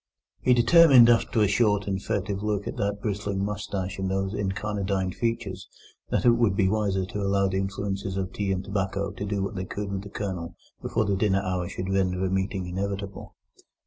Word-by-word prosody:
He 125 - +4
determined, 125 -1 +7
after 115 -1 +2
a 105 - +5
short 105 0 +2
and 95 -1 -2
furtive 100 0 -2
look 105 -1 -1
at - - -4
that 100 -1 -2
bristling 100 -2 -2
moustache 100 -2 -4
and 95 0 -1
those 95 +1 -1
incarnadined 100 -2 -2
features, 115 -5 -3 0.4
that - - 0
it 120 - +8
would 115 -4 +2
be 95 -2 +3
wiser 100 -2 0
to 100 +2 -5
allow 100 0 +2
the 95 0 -1
influences 95 0 -3
of 95 -1 -3
tea 100 -1 -1
and 95 0 -1
tobacco 100 0 -2
to - - -6
do 100 -1 -1
what 100 - -3
they 95 -2 -4
could 100 +1 -5
with 95 -1 -2
the 100 - -10
Colonel 95 -5 -5 0.3
before 110 - 0
the 100 -1 +1
dinner 100 -1 +1
hour 90 -1 -2
should 95 +1 -4
render 95 -1 +1
a 95 - -1
meeting 95 0 -1
inevitable. 100 +2 -5
100 Hz, 200 wpm, -26 LUFS, 95-105 Hz, 0.4 s, it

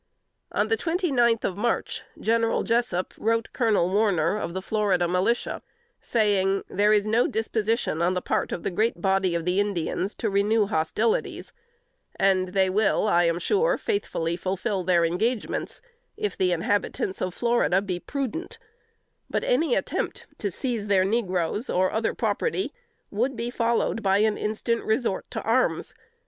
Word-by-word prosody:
On - - 0
the 450 - +2
twenty 350 -1 -1
ninth 235 -3 +3
of 185 - -1
March, 230 +3 -1 0.2
General 230 0 +1
Jessup 230 -6 0
wrote 230 +1 0
Colonel 220 -8 +2
Warner, 190 -3 +2
of 180 -4 -4
the 190 - -2
Florida 195 -5 +1
Militia, 185 +7 0 0.4
saying, 195 -4 +1
"There 205 +2 +2
is 210 -1 +3
no 225 +3 +2
disposition 220 -5 -1
on 180 +2 +2
the - - +1
part - - -1
of 170 - -4
the - - -1
great 215 +1 0
body 190 -1 +1
of 165 -1 -2
the 180 +2 +1
Indians 200 0 -1
to 230 - -2
renew 205 +2 +3
hostilities; 200 +5 -1 0.6
and 190 -1 +2
they 190 +1 +2
will, 205 +2 +2
I 175 -3 +4
am 170 0 +1
sure, 450 - +2
faithfully 170 - -2
fulfill 190 +2 -2
their 175 -2 +3
engagements, 215 +8 -2 0.3
if 425 -1 -2
the 185 -1 +1
inhabitants 190 +2 -1
of 185 -1 -2
Florida 235 -6 +2
be 190 -3 -3
prudent: 280 - -4 0.7
but - - -1
any - - +2
attempt - - -2
to 205 - -1
seize 225 +1 -2
their 190 -2 +3
negroes, 195 0 -1
or 185 +1 +2
other 220 +1 -1
property, 420 -5 -1 0.4
would 245 +6 0
be 235 +1 -3
followed 230 -1 0
by 195 -1 +3
an 215 0 +2
instant 220 +2 -1
resort 220 -3 -1
to - - -4
arms. 240 +4 +1
210 Hz, 160 wpm, -25 LUFS, 185-230 Hz, 0.7 s, I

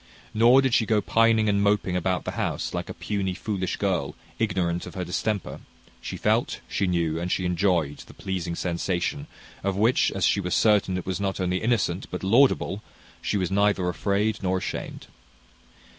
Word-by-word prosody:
Nor 120 +5 +6
did 130 -3 +1
she 110 - +3
go 110 -1 +3
pining 110 +1 +3
and 100 -1 +2
moping 100 -3 +1
about 90 0 0
the - - -2
house, - - -3
like - - -4
a - - -4
puny, 95 -3 -2
foolish 95 -3 -3
girl, 95 -4 -1 0.2
ignorant 90 -5 -1
of - - -10
her 90 -1 -3
distemper: 100 +3 -3 0.4
she - - -5
felt, - - +1
she 100 - -1
knew, 85 -3 0
and 90 +1 -3
she 90 - 0
enjoyed, 85 -5 +1
the - - -14
pleasing 90 -3 -3
sensation, 90 - -2 0.4
of 100 -1 0
which, 115 +5 +3
as 95 -3 0
she - - +3
was 90 -1 -1
certain 100 -4 +3
it 90 - -5
was 95 +1 -2
not 100 -1 -2
only 90 0 0
innocent 110 -6 0
but 90 - -5
laudable, 110 -1 +3 0.4
she - - -1
was 95 -1 -1
neither 100 -2 +2
afraid 100 +5 0
nor 95 -1 0
ashamed. 95 - -5
95 Hz, 180 wpm, -25 LUFS, 90-105 Hz, 0.4 s, Nor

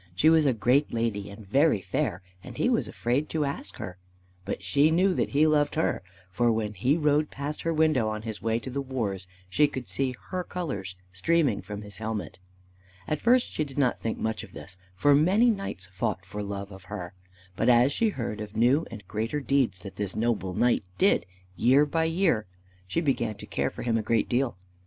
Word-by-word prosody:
She 155 - +5
was 160 -2 +5
a - - +5
great 125 +6 +2
lady 110 -3 -1
and 100 +1 -11
very 140 +2 +3
fair, 90 0 -2 0.2
and - - -10
he - - +2
was - - +1
afraid 130 +6 -1
to 155 -2 0
ask 140 - -4
her. 90 0 -7 0.5
But - - -4
she 140 +12 +4
knew 185 +4 +3
that - - 0
he 145 +2 +3
loved 150 -2 +2
her, 160 - +1 0.3
for 120 +6 +2
when 110 -2 -1
he 125 - +2
rode 150 -1 +2
past 145 +2 -5
her 165 - 0
window 155 -8 +2
on 110 0 -4
his 110 -2 -6
way 115 0 +1
to 130 - -6
the 140 +2 -2
wars, 110 -9 -3 0.2
she 145 +11 +3
could 130 -4 -6
see 130 -2 -1 0.2
her 185 -1 -1
colors 135 - -4 0.2
streaming 130 - +2
from 105 +3 -7
his 100 -2 -9
helmet. 110 -6 -4 0.7
At 155 - -1
first 245 +1 +3
she 155 - -1
did 140 -2 -9
not 130 -4 +2
think 115 - -2
much 110 0 -2
of - - -12
this, - - -8 0.2
for 145 +10 +4
many 190 +11 +5
knights 195 - -4
fought 100 -1 -2
for 105 +3 -6
love 100 0 -5
of 95 -1 -12
her; 90 -2 -6 0.4
but 115 +5 +2
as 125 +3 +5
she 225 +6 +2
heard 115 - -4
of 105 0 -7
new 130 +8 +3
and 105 -5 -10
greater 115 +9 -2
deeds 135 -9 +1
that 95 - -9
this 100 -2 -3
noble 110 -5 -1
knight 120 -3 +2
did 195 - +3 0.3
year 130 - +5
by 160 +2 0
year, 165 - +1 0.4
she 165 - 0
began 120 -8 0
to - - -10
care - - -1
for - - -8
him 115 -2 +1
a - - 0
great 110 0 +1
deal. 120 -4 0
120 Hz, 210 wpm, -27 LUFS, 105-150 Hz, 0.7 s, She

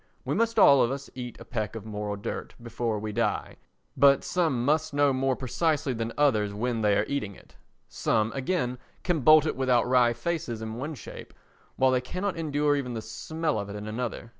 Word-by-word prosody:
We - - -1
must 230 0 0
all 140 -10 +7
of 120 - +3
us 140 +1 -5
eat 125 -2 -7
a - - -10
peck 110 -2 -3
of 110 -2 -7
moral 105 -1 -4
dirt 100 - -6
before 115 -1 -3
we 105 +1 -4
die, 115 +2 -1 0.4
but 140 +1 +5
some 155 -9 0
must 155 +1 +1
know 145 -1 +4
more 130 0 +1
precisely 145 +2 0
than 115 0 -3
others 110 -9 +2
when 115 +1 -1
they 105 -1 +3
are 105 - +1
eating 105 -9 -3
it; - - -19 0.3
some, 110 0 0
again, 130 -3 -1 0.2
can 175 -4 +1
bolt 155 +3 +6
it 155 - -1
without 125 -3 +2
wry 125 -2 +4
faces 120 -2 -3
in 110 0 -5
one 145 +7 -5
shape, 120 - -10 0.4
while 130 0 +3
they 130 -1 +2
cannot 185 +9 -3
endure 150 -2 +1
even 125 -4 -3
the 110 - -3
smell 155 +4 -3
of 100 0 -5
it 100 - -6
in 105 +1 -6
another. 115 +1 -4
125 Hz, 205 wpm, -27 LUFS, 110-145 Hz, 0.4 s, all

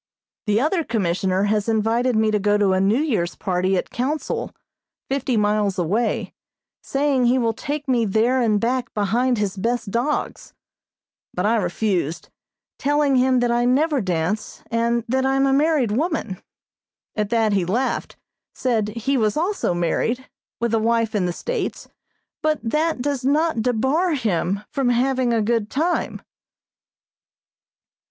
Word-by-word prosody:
The 210 +1 +3
other 320 +6 +1
Commissioner 190 - 0
has 210 +1 0
invited 225 +3 +1
me 220 0 +2
to 210 - +1
go 205 +1 +2
to 200 -2 +2
a 185 - +2
New 200 +4 +3
Year's 205 - -1
party 185 0 0
at - - -3
Council, 280 +6 -2 0.6
fifty 265 -3 -1
miles 210 -2 +1
away, 205 +7 -1 0.5
saying 275 -2 +1
he 250 +2 +3
will 230 -3 +1
take 290 +4 -4
me 245 -3 +2
there 230 +6 +2
and 215 -3 +2
back 245 +3 -1
behind 235 +5 +1
his 205 -2 -1
best 230 +1 -2
dogs, 250 +7 -2 0.8
but 180 - -1
I 225 +2 +3
refused, 175 -4 -1 0.5
telling 290 -1 +2
him 255 0 +3
that 240 -1 +1
I 240 0 +2
never 280 +3 +2
dance, 185 +2 -2
and 235 0 +1
that 260 +2 +1
I 270 0 +1
am 270 0 +3
a 270 - +2
married 290 -5 +2
woman. 260 - -2 0.7
At 210 -2 -1
that 225 -2 +2
he 195 -2 +2
laughed, 230 +10 -2 0.4
said 230 -5 0
he 230 +6 -1
was 215 0 +1
also 345 - 0
married, 230 +9 -1 0.3
with 235 -1 -1
a 225 - +3
wife 230 0 +1
in 195 -4 +1
the - - -1
States, 485 - -4 0.5
but 310 -1 +1
that 300 +3 0
does 280 -2 -1
not 295 -1 +1
debar 265 +9 +1
him 200 - -1
from 270 -3 0
having 255 0 +1
a 225 -2 +2
good 225 -1 0
time. 335 +5 -1
235 Hz, 155 wpm, -22 LUFS, 210-265 Hz, 0.8 s, The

